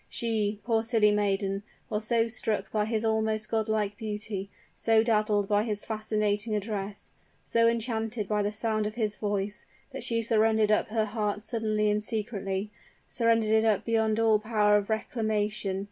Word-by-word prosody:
She 215 -3 -1
poor 225 -2 +1
silly 225 -2 +3
maiden! 195 -1 0 0.3
was 215 0 -3
so 230 -1 +2
struck 215 -3 -2
by 210 -1 +1
his 220 0 -1
almost 220 -1 0
god 220 -1 0
like 210 -2 0
beauty 210 -2 -4 0.2
so 225 -1 +3
dazzled 210 -3 +2
by 205 0 +3
his 210 -2 -3
fascinating 215 0 -1
address 205 -1 -4 0.3
so 230 0 +3
enchanted 225 -2 -1
by 210 0 +1
the 205 0 0
sound 215 0 0
of 215 - -6
his 215 -3 0
voice, 205 +1 -3 0.2
that 270 -1 -6
she 230 -1 0
surrendered 220 -1 +3
up 210 - +2
her 220 0 0
heart 210 -1 -2
suddenly 215 -3 0
and 210 0 0
secretly 210 -2 -2 0.4
surrendered 225 -2 +2
it 220 -3 +2
beyond 220 -1 +1
all 220 -2 +4
power 210 -1 +2
of 205 0 +1
reclamation. 215 -3 -1
215 Hz, 160 wpm, -28 LUFS, 210-225 Hz, 0.4 s, all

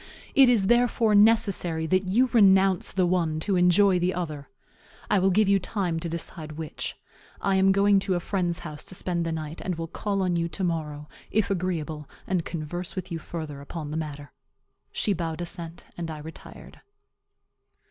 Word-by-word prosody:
It 270 -2 +7
is, 225 -6 +3
therefore, 240 -1 +3
necessary 205 -6 +3
that 185 +3 +1
you 215 +8 +3
renounce 195 -4 +4
the 185 -1 +2
one 170 -3 0
to 195 +3 0
enjoy 180 +1 +4
the 180 +1 0
other; 155 -6 -5 0.6
I 205 - +4
will 190 +1 +3
give 205 +2 +3
you 200 0 +4
time 180 -3 -2
to 170 +1 -4
decide 160 -1 -5
which. 155 0 -5 0.4
I 195 -1 +1
am 190 0 +5
going 200 +1 +4
to 190 -1 -1
a - - 0
friend's 175 -2 -1
house 150 -2 -7
to 185 - -3
spend 170 -2 -1
the - - -1
night, 160 0 -5
and 185 - -2
will 165 0 -4
call 195 +4 -2
on 180 -1 +1
you 170 0 0
to 165 +4 -5
morrow, 150 -4 -3 0.2
if 205 -1 +1
agreeable, 165 -5 -3 0.2
and 180 -3 0
converse 170 +2 -5
with 185 -1 -5
you 165 - -3
further 155 -4 -7
upon 150 +1 -6
the - - -4
matter." 145 -2 -6 0.6
She 210 - +1
bowed 165 -2 -3
assent, 170 -1 -5
and 170 -1 -5
I 155 - -5
retired. 160 +2 -11
175 Hz, 185 wpm, -26 LUFS, 160-195 Hz, 0.6 s, It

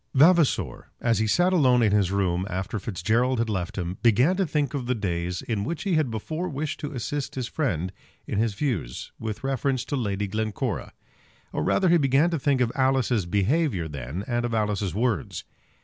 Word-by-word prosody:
Vavasor, 160 +2 +3
as 115 -3 +1
he 110 - +1
sat 175 - +3
alone 130 -8 +4
in 105 - +3
his 100 -3 +3
room, 95 -2 0
after 95 +3 -3
Fitzgerald 115 +7 0
had 115 -1 0
left 95 -2 -3
him, 90 0 -3
began 120 - +4
to 190 -1 0
think 150 -1 0
of 130 -4 -3
the 125 - +1
days 90 -4 -2
in 110 -4 -2
which 165 +7 -3
he 195 -3 0
had 155 -5 +2
before 155 +11 -3
wished 145 0 -3
to 145 - -4
assist 135 +2 -4
his 130 -3 -2
friend 95 - -2 0.3
in 100 - -2
his 110 -2 +1
views 100 - -3
with 110 +1 -5
reference 135 -1 0
to 145 - -2
Lady 105 -5 -1
Glencora; 110 +1 -3 0.6
or - - -1
rather 190 - +2
he 170 - +6
began 140 +3 +3
to 165 - 0
think 135 -1 +2
of 120 -2 +2
Alice's 130 -7 +1
behaviour 100 - +1
then, 70 +5 -5
and 120 -1 0
of 120 -1 -1
Alice's 105 -4 -1
words. 115 0 -1
115 Hz, 195 wpm, -26 LUFS, 100-140 Hz, 0.6 s, he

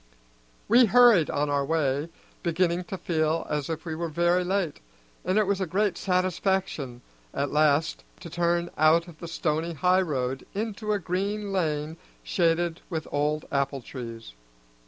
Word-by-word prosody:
We 240 +3 +6
hurried 230 - +6
on 145 0 0
our 140 -1 +1
way, 145 0 0 0.3
beginning 175 +1 0
to 190 - -5
feel 160 -2 0
as 150 -1 -2
if 160 0 -4
we 165 - -3
were 165 +1 -3
very 175 +3 +2
late, 185 -4 -1 0.4
and 185 +3 0
it 215 - +4
was 195 0 0
a 190 - -1
great 195 +2 +1
satisfaction 185 - -1 0.3
at 140 +1 -1
last 150 +1 +2 0.2
to 175 - -8
turn 175 0 0
out 160 +2 +4
of 165 -3 -13
the 170 - -7
stony 165 0 -1
highroad 145 -6 +1
into 215 0 -3
a 210 - +2
green 200 +3 -2
lane 155 -3 -1 0.3
shaded 170 -1 +1
with 160 -3 -4
old 150 +1 0
apple 140 -1 -1
trees. 115 - -8
170 Hz, 155 wpm, -26 LUFS, 150-185 Hz, 0.4 s, We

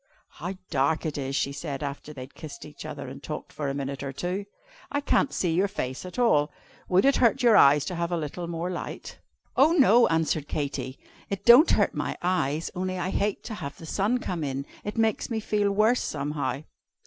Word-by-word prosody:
"How 180 +4 -4 0.2
dark 140 +5 +1
it 155 - -2
is!" 135 -1 -3
she 140 - 0
said, 140 -1 -5
after 140 +1 -5
they 140 -4 -9
had 130 - -13
kissed 155 -3 -9
each 150 +1 -9
other 150 -3 -6
and 135 +2 -9
talked 150 +1 -6
for 145 -2 -3
a 135 - -3
minute 140 -1 -4
or 140 -1 -4
two; 180 +8 -3 0.5
"I 285 - +1
can't 285 -1 +2
see 175 -3 0
your 190 +4 +3
face 135 -5 -4
at 180 - -10
all. 150 -12 +3 0.4
Would 185 +4 +4
it 275 - +4
hurt 235 0 +3
your 235 -3 +6
eyes 145 +1 +6
to 180 - -4
have 170 0 -2
a 175 - +1
little 165 +3 -4
more 170 +1 -3
light?" 175 - -6 0.4
"Oh 295 +5 +5
no!" 245 - +6
answered 160 -2 0
Katy. 140 -3 -3 0.3
"It 200 -2 -4
don't 245 +7 +8
hurt - - +3
my - - -3
eyes, 165 -4 0
only 185 0 -2
I 180 +1 -2
hate 205 0 -1
to 230 - -6
have 140 -8 -6
the 165 - -10
sun 205 +9 +1
come 180 -9 -3
in. 135 -1 -3 0.2
It 210 +2 -5
makes 225 -2 +1
me 225 -2 -1
feel 210 -1 +1
worse, 215 +5 +3
somehow." 145 0 -3
170 Hz, 215 wpm, -27 LUFS, 145-205 Hz, 0.5 s, don't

